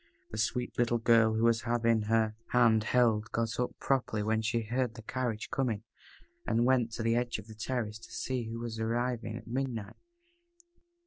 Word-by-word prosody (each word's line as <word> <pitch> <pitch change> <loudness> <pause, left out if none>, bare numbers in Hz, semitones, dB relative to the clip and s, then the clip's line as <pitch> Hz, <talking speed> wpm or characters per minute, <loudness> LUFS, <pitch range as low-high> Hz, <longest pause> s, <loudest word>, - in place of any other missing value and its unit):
The 110 - -4
sweet 125 +3 -1
little 120 0 +3
girl, 115 -1 +4
who 110 - +1
was 115 -1 +4
having 115 -1 +2
her 110 -1 +2 0.2
hand 115 -3 +5
held, 115 -3 +2
got 115 +1 -1
up 125 - -1
properly 125 -6 0
when 110 +1 +1
she 115 +1 0
heard 120 +1 -1
the 115 - -10
carriage 120 -2 -3
coming, 125 -9 -1 0.6
and 115 +1 +1
went 125 -3 +3
to 115 - -3
the 115 0 +2
edge 120 0 0
of 105 - -9
the 110 - -11
terrace 110 -1 -3
to 115 - -14
see 125 -3 -2
who 115 - -5
was 115 -1 -5
arriving 115 0 -1
at 115 - -10
midnight. 120 -4 -3
115 Hz, 185 wpm, -31 LUFS, 110-120 Hz, 0.6 s, hand